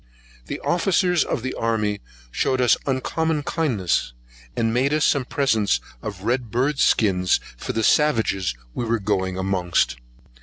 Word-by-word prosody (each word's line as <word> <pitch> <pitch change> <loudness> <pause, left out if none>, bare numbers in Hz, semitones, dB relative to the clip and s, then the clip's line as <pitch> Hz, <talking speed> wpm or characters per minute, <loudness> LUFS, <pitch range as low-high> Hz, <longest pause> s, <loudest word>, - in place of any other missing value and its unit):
The - - -4
officers 180 -1 +2
of 115 - -3
the 130 - -3
army 105 -3 -1 0.3
shewed 130 - 0
us 125 -2 +5
uncommon 150 +4 -1
kindness, 115 - 0 0.4
and 115 0 0
made 135 +5 +2
us 155 - +2
some 140 -4 +2
presents 115 -8 +1 0.2
of 100 -3 -7
red 120 +1 -1
bird 135 +5 0
skins 90 -5 +3 0.2
for - - -5
the 115 - -1
savages 110 - +2 0.2
we - - -3
were 115 0 +1
going 95 -3 -1
amongst. 90 -9 0
115 Hz, 145 wpm, -23 LUFS, 100-140 Hz, 0.4 s, us